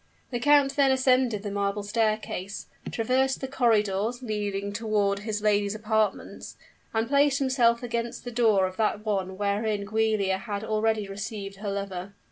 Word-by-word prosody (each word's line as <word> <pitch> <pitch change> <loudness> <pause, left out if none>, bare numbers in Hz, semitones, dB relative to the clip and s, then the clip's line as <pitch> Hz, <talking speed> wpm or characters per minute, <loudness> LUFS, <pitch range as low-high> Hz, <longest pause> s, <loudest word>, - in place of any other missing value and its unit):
The 240 - -1
count 285 +1 +4
then 275 -1 +5
ascended 255 -5 +2
the 205 - -4
marble 200 0 -1
staircase, 215 -2 -2 0.3
traversed 260 +3 +1
the 265 - -4
corridors 225 -2 +1
leading 205 -3 -3
toward 205 -2 0
his 210 0 -4
lady's 205 -1 +2
apartments, 215 -1 -2 0.3
and 225 0 0
placed 280 +1 +3
himself 255 -4 +2
against 235 0 -3
the 245 - -6
door 220 -5 +3
of 185 0 -5
that 215 -1 0
one 190 -3 -1
wherein 205 0 -1
Giulia 215 -3 +1
had 205 0 -4
already 215 -1 0
received 195 0 -6
her 205 +1 -4
lover. 195 -1 -5
215 Hz, 150 wpm, -27 LUFS, 200-235 Hz, 0.3 s, then